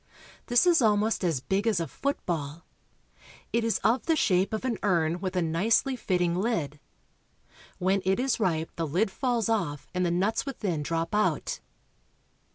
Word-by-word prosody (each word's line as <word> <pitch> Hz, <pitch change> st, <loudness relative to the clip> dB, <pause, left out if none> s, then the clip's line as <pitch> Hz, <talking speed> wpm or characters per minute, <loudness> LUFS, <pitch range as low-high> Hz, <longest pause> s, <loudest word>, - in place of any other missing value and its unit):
This 245 Hz, +7 st, +4 dB
is 345 Hz, -4 st, +5 dB
almost 215 Hz, -1 st, +2 dB
as 165 Hz, -8 st, 0 dB
big 195 Hz, +9 st, -1 dB
as 215 Hz, -6 st, +2 dB
a 165 Hz, -, -1 dB
football. 165 Hz, -, -3 dB, 0.9 s
It 230 Hz, 0 st, +2 dB
is 225 Hz, -1 st, +1 dB
of 240 Hz, +3 st, +2 dB
the 325 Hz, -, +3 dB
shape 190 Hz, -9 st, +2 dB
of 220 Hz, +3 st, -3 dB
an 235 Hz, -4 st, -1 dB
urn 170 Hz, -4 st, +1 dB
with 185 Hz, 0 st, -4 dB
a 180 Hz, -, +2 dB
nicely 210 Hz, -, +1 dB
fitting 180 Hz, -7 st, 0 dB
lid. 175 Hz, -, -1 dB, 1.0 s
When 190 Hz, +2 st, +1 dB
it 190 Hz, +3 st, +1 dB
is 255 Hz, -1 st, 0 dB
ripe 165 Hz, -6 st, 0 dB
the 165 Hz, -1 st, -1 dB
lid 185 Hz, +8 st, 0 dB
falls 240 Hz, -1 st, 0 dB
off 175 Hz, -11 st, -1 dB
and 180 Hz, 0 st, 0 dB
the 175 Hz, -, +1 dB
nuts 195 Hz, +6 st, 0 dB
within 205 Hz, -, -3 dB
drop 165 Hz, +3 st, -2 dB
out. 210 Hz, 0 st, 0 dB
190 Hz, 165 wpm, -27 LUFS, 170-225 Hz, 1.0 s, is